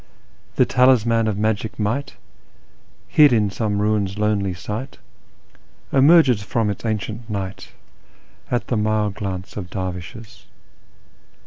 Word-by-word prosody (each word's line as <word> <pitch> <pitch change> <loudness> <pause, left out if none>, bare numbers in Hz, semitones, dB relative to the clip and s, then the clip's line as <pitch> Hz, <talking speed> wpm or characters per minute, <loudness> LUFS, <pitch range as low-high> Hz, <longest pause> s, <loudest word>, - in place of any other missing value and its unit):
" - - -34
" - - -35
The - - +4
talisman 115 -3 +3
of 105 -2 -1
magic 110 +1 -1
might, 130 +7 -2 0.9
hid 150 -2 +6
in 105 -4 +2
some 105 -1 -2
ruin's 105 -2 0
lonely 105 -3 0
site, 105 +9 -6 1.0
Emerges 135 -5 +5
from 105 +1 -1
its 100 - -7
ancient 110 +2 -4
night 95 -2 -5 0.8
at 120 - -1
the 120 - +1
mild 105 -1 0
glance 95 -1 -6
of 90 -4 -6
dervishes." 95 +6 -7
105 Hz, 125 wpm, -21 LUFS, 100-120 Hz, 1.0 s, hid